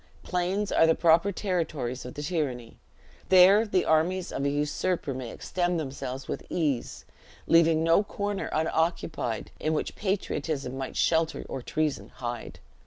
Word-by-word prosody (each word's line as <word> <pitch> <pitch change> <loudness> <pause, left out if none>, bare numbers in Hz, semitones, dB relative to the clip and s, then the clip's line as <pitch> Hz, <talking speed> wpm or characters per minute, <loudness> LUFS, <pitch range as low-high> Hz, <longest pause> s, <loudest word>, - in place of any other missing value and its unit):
Plains 185 +3 -1
are 165 - +5
the 160 - +4
proper 170 +4 +4
territories 160 - -2
of 125 - -8
tyranny; 145 -6 -3 0.5
there 190 +4 +7
the 185 -3 +1
armies 175 +4 +1
of 140 - -3
a 140 - +2
usurper 145 +2 -1
may 130 -2 -5
extend 175 +4 -1
themselves 135 -2 -5
with - - -4
ease; 145 -8 -2 0.4
leaving 165 -1 +4
no 165 +3 +5
corner 205 -1 -3
unoccupied 160 -7 -1
in 155 - 0
which 155 - -2
patriotism 155 -9 -2
might 135 -1 -5
shelter 160 -1 +1
or 135 - -5
treason 155 +3 -2
hide. 120 -2 -5
160 Hz, 140 wpm, -27 LUFS, 135-180 Hz, 0.5 s, there